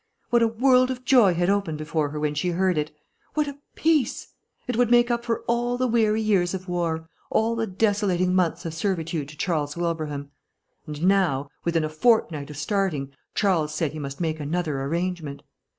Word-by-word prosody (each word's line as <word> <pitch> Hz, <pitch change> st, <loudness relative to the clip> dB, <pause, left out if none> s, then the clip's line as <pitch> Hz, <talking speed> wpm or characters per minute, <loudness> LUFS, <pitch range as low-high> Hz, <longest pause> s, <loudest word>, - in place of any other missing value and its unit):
What 240 Hz, -1 st, +4 dB
a 230 Hz, -, +5 dB
world 255 Hz, +3 st, +4 dB
of 255 Hz, -1 st, -5 dB
joy 235 Hz, -9 st, +5 dB
had 175 Hz, +1 st, +1 dB
opened 195 Hz, -6 st, 0 dB
before 155 Hz, -1 st, -1 dB
her 150 Hz, +1 st, -5 dB
when 150 Hz, -1 st, 0 dB
she 150 Hz, +5 st, -1 dB
heard 185 Hz, +1 st, +1 dB
it! 150 Hz, 0 st, -1 dB, 0.5 s
What 300 Hz, -1 st, +1 dB
a 285 Hz, 0 st, -7 dB, 0.2 s
peace! 310 Hz, -6 st, +1 dB, 0.4 s
It 250 Hz, -, -2 dB
would 245 Hz, 0 st, +3 dB
make 240 Hz, 0 st, +5 dB
up 235 Hz, 0 st, 0 dB
for 230 Hz, -1 st, -1 dB
all 240 Hz, +1 st, 0 dB
the 255 Hz, -, +1 dB
weary 220 Hz, -2 st, +2 dB
years 190 Hz, -4 st, +2 dB
of 185 Hz, 0 st, -7 dB
war, 165 Hz, -2 st, -2 dB, 0.2 s
all 225 Hz, +1 st, +1 dB
the 225 Hz, -1 st, -1 dB
desolating 190 Hz, -3 st, +1 dB
months 175 Hz, -2 st, +1 dB
of 165 Hz, -, -3 dB
servitude 165 Hz, -4 st, -2 dB
to 150 Hz, -, -12 dB
Charles 150 Hz, -4 st, -1 dB
Wilbraham. 155 Hz, -4 st, -3 dB, 0.6 s
And 150 Hz, +1 st, -6 dB
now, 175 Hz, -8 st, +2 dB
within 165 Hz, -2 st, +1 dB
a -, -, 0 dB
fortnight 155 Hz, -5 st, +2 dB
of 150 Hz, -, -8 dB
starting, 150 Hz, -4 st, -1 dB, 0.2 s
Charles 165 Hz, -7 st, +1 dB
said 155 Hz, -2 st, 0 dB
he 155 Hz, -, -7 dB
must 140 Hz, -1 st, -6 dB
make 160 Hz, -2 st, -1 dB
another 150 Hz, -2 st, -2 dB
arrangement. 165 Hz, -1 st, -3 dB
175 Hz, 190 wpm, -25 LUFS, 155-220 Hz, 0.6 s, a